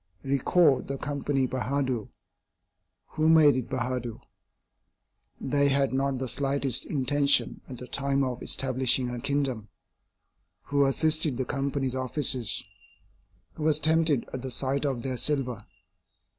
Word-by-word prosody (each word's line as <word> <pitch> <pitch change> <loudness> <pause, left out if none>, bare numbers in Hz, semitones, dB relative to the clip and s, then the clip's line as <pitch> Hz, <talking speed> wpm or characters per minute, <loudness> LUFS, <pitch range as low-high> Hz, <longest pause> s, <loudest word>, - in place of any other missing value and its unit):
Recall 140 +2 +3
the 140 - -5
Company 140 -1 -1
Bahadur. 130 -2 -2 1.0
Who 155 0 +1
made 155 -4 +6
it 130 -2 -3
Bahadur? 125 -2 -3 1.2
They 140 +1 +1
had 135 -1 +1
not 135 0 0
the 130 0 -3
slightest 135 -1 0
intention 140 0 +2
at 125 - -7
the 125 - -7
time 140 +1 0
of 125 -2 -3
establishing 130 -1 +1
a 120 -1 -5
kingdom. 135 -6 -2 0.9
Who 140 -1 +2
assisted 155 -1 +1
the 130 - -1
Company's 135 -1 -2
officers? 130 -5 0 0.9
Who - - -10
was 155 -1 +3
tempted 160 -4 +2
at 130 - -4
the 130 - -5
sight 135 +3 -1
of 125 -4 -3
their 130 -2 -3
silver? 125 -6 -1
135 Hz, 130 wpm, -27 LUFS, 130-140 Hz, 1.2 s, made